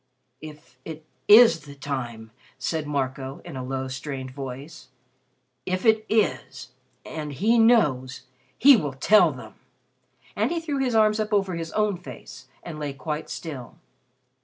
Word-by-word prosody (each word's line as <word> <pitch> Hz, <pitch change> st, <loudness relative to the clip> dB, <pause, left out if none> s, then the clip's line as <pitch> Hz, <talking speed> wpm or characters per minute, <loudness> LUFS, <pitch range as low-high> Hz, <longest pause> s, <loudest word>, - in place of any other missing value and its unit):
"If 150 Hz, 0 st, -13 dB
it 160 Hz, -1 st, -9 dB, 0.2 s
is 220 Hz, -4 st, +8 dB
the 145 Hz, -2 st, -13 dB
time," 120 Hz, -6 st, -5 dB, 0.3 s
said 150 Hz, +4 st, -3 dB
Marco 135 Hz, -1 st, -3 dB
in 170 Hz, -5 st, -8 dB
a 130 Hz, -, -5 dB
low, 130 Hz, +1 st, -3 dB
strained 130 Hz, 0 st, -6 dB
voice 135 Hz, +3 st, -8 dB, 0.8 s
"if 185 Hz, -, -3 dB
it 220 Hz, -1 st, +3 dB
is, 220 Hz, 0 st, -1 dB, 0.3 s
and 150 Hz, -2 st, -6 dB
he 220 Hz, -, +2 dB
knows 145 Hz, -, +2 dB, 0.3 s
he 280 Hz, 0 st, +8 dB
will 145 Hz, -, -2 dB
tell 205 Hz, +11 st, +4 dB
them." -, -, -11 dB, 0.8 s
And -, -, +1 dB
he 340 Hz, -, -1 dB
threw 300 Hz, -4 st, -3 dB
his 255 Hz, -3 st, 0 dB
arms 215 Hz, 0 st, +3 dB
up 215 Hz, 0 st, -2 dB
over 195 Hz, -3 st, +1 dB
his 165 Hz, -1 st, -5 dB
own 210 Hz, -3 st, +1 dB
face 130 Hz, -6 st, -12 dB, 0.2 s
and 160 Hz, -3 st, -8 dB
lay 145 Hz, -2 st, -4 dB
quite 150 Hz, +3 st, -5 dB
still. 140 Hz, -8 st, -7 dB
155 Hz, 150 wpm, -25 LUFS, 135-210 Hz, 0.8 s, is